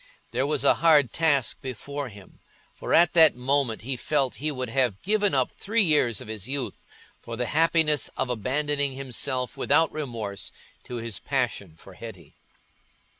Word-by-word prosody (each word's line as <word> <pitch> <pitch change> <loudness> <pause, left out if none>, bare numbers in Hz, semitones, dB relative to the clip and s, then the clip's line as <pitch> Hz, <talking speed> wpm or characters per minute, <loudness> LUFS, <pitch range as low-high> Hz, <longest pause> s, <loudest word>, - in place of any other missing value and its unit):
There 130 +4 0
was 150 - 0
a - - +6
hard 150 -7 +5
task 145 -7 +1
before 135 +2 -5
him, 100 -3 -15 0.3
for - - -7
at 170 -1 +5
that 160 -5 +6
moment 125 -2 0
he 130 +2 -2
felt 135 +1 -1
he 155 +2 -2
would 130 -3 -4
have 125 -7 +1
given 205 -3 +1
up 130 -2 +1
three 220 +2 0
years 145 - +2
of - - -9
his 110 -1 -6
youth 135 -2 -3 0.4
for 115 - -7
the 125 - -1
happiness 160 0 +2
of - - 0
abandoning 140 +4 0
himself 130 -1 -2
without 160 +3 +2
remorse 115 -9 -5 0.3
to 125 - -7
his 115 -6 -4
passion 80 - -2
for 95 +4 -14
Hetty. 90 -7 -11
135 Hz, 165 wpm, -26 LUFS, 115-150 Hz, 0.4 s, a